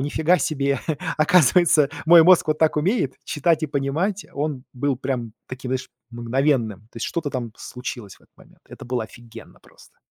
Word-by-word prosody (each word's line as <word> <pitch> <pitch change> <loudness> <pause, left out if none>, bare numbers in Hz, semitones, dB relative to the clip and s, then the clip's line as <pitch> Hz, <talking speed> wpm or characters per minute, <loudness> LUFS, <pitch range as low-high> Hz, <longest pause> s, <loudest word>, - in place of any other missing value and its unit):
нифига 160 +5 +2
себе, 140 -3 -1 0.4
оказывается, 160 -2 +4 0.2
мой 170 +1 +8
мозг 180 -2 +6
вот 155 0 +1
так 160 -1 +2
умеет: 155 - 0
читать 160 +2 0
и - - +1
понимать", 150 +8 -2
он 140 -2 -3
был 135 +1 -1
прям 125 -4 -4
таким, 130 0 -7
знаешь, 130 0 -3 0.2
мгновенным. 120 -3 0
То - - -18
есть 115 - -3
что-то 165 -4 -3
там 120 -4 -4
случилось 120 -5 -8
в - - -29
этот - - -29
момент. - - -21
Это - - -11
было 120 -2 -2
офигенно 120 0 -14
просто. - - -21
140 Hz, 170 wpm, -22 LUFS, 125-155 Hz, 0.4 s, мой